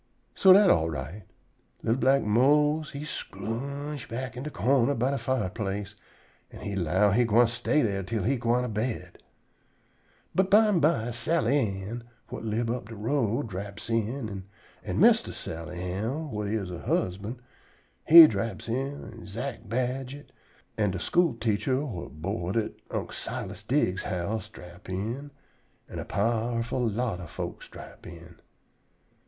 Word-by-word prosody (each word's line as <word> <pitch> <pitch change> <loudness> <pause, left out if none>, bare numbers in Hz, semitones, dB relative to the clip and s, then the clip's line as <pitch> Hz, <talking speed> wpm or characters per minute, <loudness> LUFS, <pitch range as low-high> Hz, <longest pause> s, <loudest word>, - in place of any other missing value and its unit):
So 190 - +6
dat 195 +1 +8
all 80 0 +2
right. 80 +7 -6 0.6
Li'l 115 - +2
black 135 +1 +3
Mose 150 +7 +3
he 145 +1 -6
scrooge 140 +5 -5
back 125 +1 -4
in 125 - -5
de 150 - -4
corner 135 +1 +2
by 125 +4 +1
de 140 - -1
fireplace, 105 -4 -2 0.5
an' - - -12
he 100 -1 -4
'low 95 +3 +2
he 120 +5 +4
gwine 115 +1 +5
stay 120 +6 +1
dere 100 -3 0
till 105 +2 -2
he 135 +7 +1
gwine 120 +1 +1
to - - -2
bed. 110 +3 -3 1.1
But 190 0 +2
bimeby 170 - +4
Sally 140 +2 +2 0.2
Ann, 115 +4 -6 0.3
whut - - -6
live 115 +1 -1
up 120 -3 -4
de 115 - -7
road, 115 +2 0
draps 100 +4 -6
in, 110 -3 -2 0.4
an' - - -2
Mistah - - +5
Sally 85 +2 -6
Ann, 110 - -3
whut 105 -4 -3
is 100 -3 -2
her 90 -1 -6
husban', 100 +9 -2 0.7
he 165 +1 +12
draps 105 -4 -2
in 135 +5 -3
an' 115 -1 -11
Zack 115 +3 -5
Badget 130 +4 -3 0.5
an' 105 -1 +3
de 95 -1 -3
school 170 - +2
teacher 115 +3 0
whut 85 - -7
board 95 +1 -2
at 110 - -1 0.2
Unc' - - -4
Silas - - -5
Diggs's 90 +1 0
house 100 +3 -3
drap 90 +3 -13
in, 115 +10 -3 0.6
an' - - -7
a - - -5
powerful 115 +4 0
lot 110 -3 -2
ob 85 -4 -8
folks - - -6
drap - - -12
in. 85 0 -12
115 Hz, 150 wpm, -28 LUFS, 100-130 Hz, 1.1 s, he